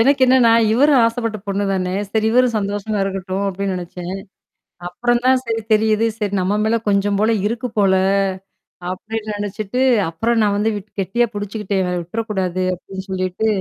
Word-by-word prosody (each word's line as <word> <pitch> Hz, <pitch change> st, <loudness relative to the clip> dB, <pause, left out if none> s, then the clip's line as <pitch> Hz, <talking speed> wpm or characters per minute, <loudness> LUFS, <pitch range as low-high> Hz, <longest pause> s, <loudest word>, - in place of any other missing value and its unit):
எனக்கு 275 Hz, +4 st, +3 dB
என்னன்னா, 255 Hz, -2 st, +5 dB, 0.2 s
இவரும் 275 Hz, +3 st, +5 dB
ஆசைப்பட்ட 230 Hz, -1 st, -1 dB
பொண்ணு 200 Hz, +1 st, -1 dB
தானே. 185 Hz, -1 st, -1 dB, 0.2 s
சரி 220 Hz, +1 st, +1 dB
இவரும் 250 Hz, -1 st, +3 dB
சந்தோஷமா 205 Hz, +1 st, -2 dB
இருக்கட்டும் 195 Hz, 0 st, -3 dB
அப்டின்னு 195 Hz, 0 st, -2 dB
நெனைச்சேன். 180 Hz, +1 st, -6 dB, 0.7 s
அப்புறம் 240 Hz, +6 st, 0 dB
தான் 260 Hz, 0 st, +5 dB
சரி 225 Hz, -1 st, -2 dB
தெரியுது. 215 Hz, +1 st, +3 dB
சரி 205 Hz, -3 st, -2 dB
நம்ம 190 Hz, +3 st, 0 dB
மேல 220 Hz, +1 st, +2 dB
கொஞ்சம் 200 Hz, 0 st, +2 dB
போல 220 Hz, +2 st, +3 dB
இருக்கு 230 Hz, +3 st, -2 dB
போல, 195 Hz, -2 st, +4 dB, 1.0 s
அப்டின்னு 215 Hz, +4 st, -5 dB
நெனச்சுட்டு, 205 Hz, +3 st, -3 dB, 0.3 s
அப்புறம் 225 Hz, +8 st, 0 dB
நான் 205 Hz, -1 st, +2 dB
வந்து 215 Hz, +2 st, +1 dB
விட் 205 Hz, +1 st, -10 dB
கெட்டியா 235 Hz, +6 st, +1 dB
புடிச்சுக்கிட்டேன் 205 Hz, -1 st, -2 dB
இவர 180 Hz, 0 st, -1 dB
விட்டுறக்கூடாது 185 Hz, -1 st, -2 dB
அப்டின்னு 190 Hz, +1 st, -8 dB
சொல்லிட்டு, 185 Hz, +3 st, -1 dB
205 Hz, 155 wpm, -19 LUFS, 190-225 Hz, 1.0 s, என்னன்னா